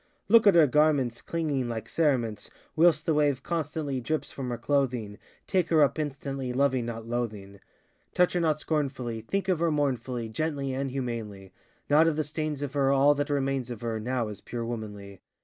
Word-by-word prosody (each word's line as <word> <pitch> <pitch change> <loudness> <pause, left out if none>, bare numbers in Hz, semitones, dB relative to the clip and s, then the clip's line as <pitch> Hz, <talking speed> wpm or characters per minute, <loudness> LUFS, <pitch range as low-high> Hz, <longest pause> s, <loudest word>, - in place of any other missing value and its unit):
Look 225 0 +6
at 200 - +7
her 165 -2 +7
garments 145 -4 +2
Clinging 145 -7 -2
like 115 -1 -4
cerements; 125 -9 0 0.3
Whilst 160 -1 +4
the 165 - +2
wave 145 -3 +1
constantly 150 -5 -2
Drips 155 +5 -2
from 130 -2 -5
her 120 - -3
clothing; 120 -5 -1 0.3
Take 185 -3 +1
her 160 -3 +5
up 140 +2 +1
instantly, 135 -3 -3
Loving 130 -2 +1
not 115 -1 -5
loathing. 105 -5 -4 0.6
Touch 180 0 +3
her 180 - +1
not 155 -3 +1
scornfully; 130 -8 -2
Think 195 - -2
of 185 -4 +1
her 170 0 +2
mournfully, 130 -5 -1
Gently 140 +3 -2
and 135 +1 -2
humanly; 115 -7 -5 0.3
Not 155 +3 +5
of 165 - +2
the 155 - 0
stains 150 -1 -3
of 140 -1 -4
her, 135 -2 +2
All 140 +1 +5
that 145 0 -2
remains 135 -3 -1
of 120 -3 -6
her 115 -2 -2
Now 120 +1 -1
is 105 - -9
pure 120 -1 -5
womanly. 105 -4 -7
135 Hz, 185 wpm, -28 LUFS, 120-155 Hz, 0.6 s, at